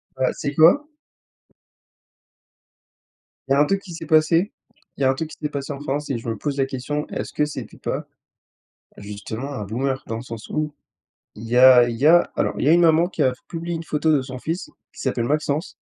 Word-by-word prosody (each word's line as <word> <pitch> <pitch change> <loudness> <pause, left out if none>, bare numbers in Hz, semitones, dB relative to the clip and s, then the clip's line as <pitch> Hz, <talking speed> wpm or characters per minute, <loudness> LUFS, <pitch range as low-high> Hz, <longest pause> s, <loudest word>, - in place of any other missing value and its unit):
Bah, 130 0 +1
tu - - -12
sais 140 - -8
quoi? 180 - +5 2.6
Il - - -6
y 135 - +6
a - - +3
un 145 - +5
truc 195 +4 0
qui 175 -4 -10
s'est 165 0 -7
passé, 165 +5 +3 0.5
il - - -8
y - - +3
a 130 - +4
un - - +3
truc 155 +4 -4
qui - - -12
s'est 150 - -1
passé 140 -1 -5
en 140 - -5
France 145 +1 -3
et 135 - -1
je 115 - -9
me 115 - -1
pose 140 +6 -3
la 135 - +2
question: 135 +3 -3
«Est-ce - - -5
que 150 - +1
c'était 150 - -8
pas - - -4 0.9
justement 105 +6 -6
un 105 - -4
boomer?» 130 +6 -2
dans 115 - -4
le 115 - -6
sens 115 -3 -9
où, 155 -1 -2 0.6
il 110 - -10
y 115 +2 -2
a 125 -1 +8
il 115 - -3
y 140 +5 +3
a 175 +2 +5
alors, - - 0
il - - -1
y - - +4
a - - +7
une 175 - +5
maman 165 +1 +4
qui 185 - -4
a 130 - +4 0.2
publié 170 0 -4
une 165 - -5
photo 155 0 0
de 145 - +3
son 130 -1 -7
fils 165 +7 -4 0.2
qui - - -10
s'appelle 125 -3 -1
Maxence, 150 +4 -1
145 Hz, 235 wpm, -22 LUFS, 130-160 Hz, 2.6 s, a